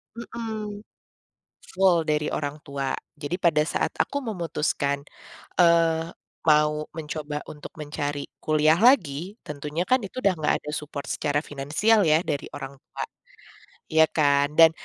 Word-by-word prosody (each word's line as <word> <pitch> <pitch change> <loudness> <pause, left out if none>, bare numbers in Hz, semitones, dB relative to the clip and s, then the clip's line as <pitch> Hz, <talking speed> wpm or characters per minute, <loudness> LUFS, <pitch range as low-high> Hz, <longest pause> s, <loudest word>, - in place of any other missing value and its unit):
Mhm. 220 -3 -5 1.0
Full 190 -2 +5
dari 150 0 +1
orang 145 0 -2
tua. 140 -2 -2 0.2
Jadi 145 +5 -2
pada 170 -4 +3
saat - - 0
aku 285 -1 0
memutuskan, 150 - -1 0.6
eee, 165 -1 +4 0.4
mau 150 0 +4
mencoba 150 -1 -4
untuk 150 - -10
mencari 145 -2 -3 0.2
kuliah 155 +1 +3
lagi, 190 - +3
tentunya 150 +3 -3
kan 255 +6 +3
itu 225 +4 -6
udah 195 - +4
enggak 150 -1 +2
ada 150 - -5
support 150 -2 -5
secara 145 0 0
finansial 165 +10 +2
ya 155 +1 +4
dari 140 - -2
orang 135 -1 -7
tua, - - -8 0.9
ya 160 0 +5
kan 145 -1 +2
dan 165 -1 +9
155 Hz, 135 wpm, -25 LUFS, 145-180 Hz, 1.0 s, dan